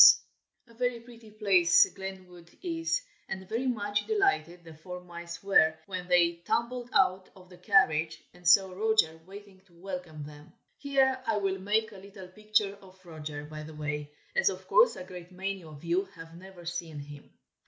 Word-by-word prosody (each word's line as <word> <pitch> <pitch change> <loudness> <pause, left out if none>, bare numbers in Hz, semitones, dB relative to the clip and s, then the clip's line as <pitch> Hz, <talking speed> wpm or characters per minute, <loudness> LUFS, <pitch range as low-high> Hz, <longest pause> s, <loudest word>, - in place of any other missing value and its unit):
A 230 - -20
very 245 0 -1
pretty 230 -1 -15
place 200 -5 +5
Glenwood 185 -3 -9
is, 335 +7 -1 0.3
and 190 -1 -5
very 230 +6 -1
much 205 -4 -1
delighted 390 - +1
the 165 -1 -11
four 180 +4 -8
mice 170 0 -9
were, 160 -5 +5
when 185 -2 -5
they 170 -1 +4
tumbled 235 +7 -2
out 190 -8 +2
of 185 -1 -16
the 180 - -13
carriage, 165 -5 +3
and 180 -1 -8
saw 190 +2 +6
Roger 195 -5 +2
waiting 200 -1 -12
to 175 - -25
welcome 175 -4 -7
them. 150 +3 -13 0.3
Here 270 -2 +2
I 225 -2 +2
will 195 -1 -1
make 215 +3 +1
a 200 - -11
little 195 -1 -11
picture 210 0 0
of 190 -1 -17
Roger, 150 -3 -7
by 155 0 -8
the 155 0 -9
way, 150 -1 -4 0.2
as 485 - +4
of - - -7
course - - +5
a - - -7
great 180 -1 -10
many 190 0 -4
of 155 -2 -12
you 175 +3 +1
have 165 0 -11
never 180 0 -12
seen 170 -3 -5
him. 145 0 -10
185 Hz, 175 wpm, -29 LUFS, 170-215 Hz, 0.3 s, saw